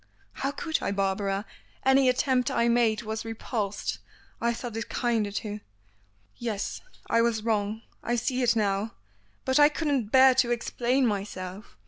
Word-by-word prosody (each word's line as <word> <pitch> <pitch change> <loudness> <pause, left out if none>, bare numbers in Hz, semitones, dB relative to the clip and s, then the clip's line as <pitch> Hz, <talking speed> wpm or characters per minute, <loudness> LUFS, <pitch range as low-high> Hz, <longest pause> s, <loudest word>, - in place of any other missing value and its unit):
"How 275 - -2
could 315 +3 -2
I, - - -1
Barbara? 195 +1 -1 0.4
Any 265 0 +5
attempt 255 0 +2
I 235 - +2
made 235 -2 +2
was 220 0 -4
repulsed. 225 -2 -3 0.4
I 235 - +2
thought 235 -1 -5
it 225 +1 -4
kinder 230 -4 0
to 210 0 -4 0.4
" 100 0 -38
"Yes 205 -2 -3 0.3
I 230 - +3
was 230 -2 +1
wrong. 215 0 -1 0.2
I 240 - -1
see 255 +2 -1
it 235 -2 +3
now. 205 0 0 0.5
But 260 +2 +3
I 290 0 +8
couldn't 290 -6 0
bear 260 +3 +7
to 250 -1 +2
explain 240 +2 +1
myself. 195 - -4
225 Hz, 155 wpm, -27 LUFS, 205-250 Hz, 0.5 s, I